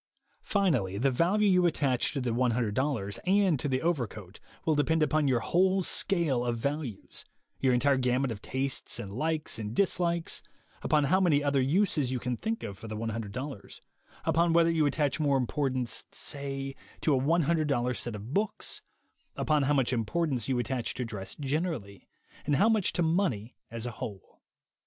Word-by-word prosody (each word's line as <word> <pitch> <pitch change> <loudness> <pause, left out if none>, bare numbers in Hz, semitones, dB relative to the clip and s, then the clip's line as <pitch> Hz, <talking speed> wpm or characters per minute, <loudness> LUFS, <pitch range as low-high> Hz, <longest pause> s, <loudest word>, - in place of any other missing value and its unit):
Finally, 160 - +1
the 135 +5 +2
value 185 +11 +3
you 180 -2 +5
attach 135 -6 +1
to 140 - -2
the 125 -2 -1
$100 115 -2 0
and 190 -6 +3
to 145 - -2
the 130 0 0
overcoat 110 - -2 0.3
will 160 - +3
depend 155 +2 +2
upon 155 -1 +2
your 125 -3 +2
whole 185 +7 +2
scale 165 -11 +1
of 120 -1 -1
values; 140 -3 -4 0.4
your 130 - +3
entire 135 +3 +3
gamut 125 0 +1
of 100 -3 -6
tastes 135 0 -2
and 100 -1 -6
likes 155 +2 -2
and 110 +1 -4
dislikes; 170 -3 +1 0.4
upon 150 -1 +2
how 185 +7 +3
many 150 -6 +3
other 140 -2 +2
uses 150 -2 +2
you 130 - 0
can 125 0 -2
think 225 - -3
of 100 -1 -6
for 115 - -8
the 110 0 -5
$100, 115 +2 -5 0.4
upon 170 +1 +3
whether 165 0 +5
you 160 -3 +3
attach 145 +1 0
more 145 -3 +3
importance, 130 -1 -1
say, 135 -1 -4 0.3
to 155 - +2
a 130 - +3
$100 150 -5 +1
set 120 -2 -3
of 105 +6 -7
books; 210 +4 -1 0.5
upon 150 -1 +2
how 140 +2 +2
much 130 -2 +2
importance 130 +1 -1
you 130 - +1
attach 120 0 -2
to 125 - -2
dress 95 -4 -6
generally, 140 - -3 0.4
and 145 - +3
how 200 +9 +4
much 220 -4 +2
to 175 - 0
money 160 - 0
as 115 0 -6
a 120 - -3
whole. 100 -3 -8
135 Hz, 170 wpm, -29 LUFS, 120-165 Hz, 0.5 s, you